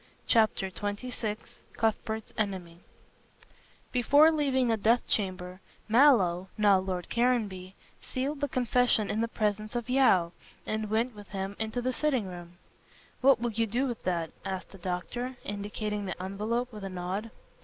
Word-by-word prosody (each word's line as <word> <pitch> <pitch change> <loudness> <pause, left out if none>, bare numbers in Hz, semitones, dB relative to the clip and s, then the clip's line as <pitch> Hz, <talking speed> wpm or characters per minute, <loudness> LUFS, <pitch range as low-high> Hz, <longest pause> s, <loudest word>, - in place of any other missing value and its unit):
CHAPTER 215 -4 +3
XXVI 210 +2 -3 0.4
CUTHBERT'S 220 0 -1
ENEMY 185 -5 -3 1.1
Before 285 +6 +6
leaving 275 -5 +2
the 225 - +3
death 225 +3 +2
chamber, 185 -2 -1 0.3
Mallow 215 -8 +5
now 205 -3 +5
Lord 185 -2 -3
Caranby 210 -6 0 0.3
sealed 275 +3 -3
the 285 - +1
confession 245 -3 +2
in 220 - 0
the 230 - +1
presence 215 -1 -2
of 240 +1 -2
Yeo, 190 -11 +4 0.3
and 215 -1 -2
went 230 +3 +1
with 205 -1 -11
him 195 0 -4
into 220 +2 -2
the 255 +1 0
sitting 265 -8 +1
room. 175 -1 -9 0.6
"What 270 -2 +6
will 240 0 -1
you 225 +1 0
do 240 +6 0
with 240 -4 -4
that?" 170 -3 -1
asked 190 -1 -5
the 195 - -13
doctor, 215 +8 -4
indicating 205 0 -3
the 185 - -5
envelope 215 +6 -2
with 210 -2 -8
a 195 - -4
nod. 185 +4 -4
215 Hz, 150 wpm, -29 LUFS, 190-245 Hz, 1.1 s, Before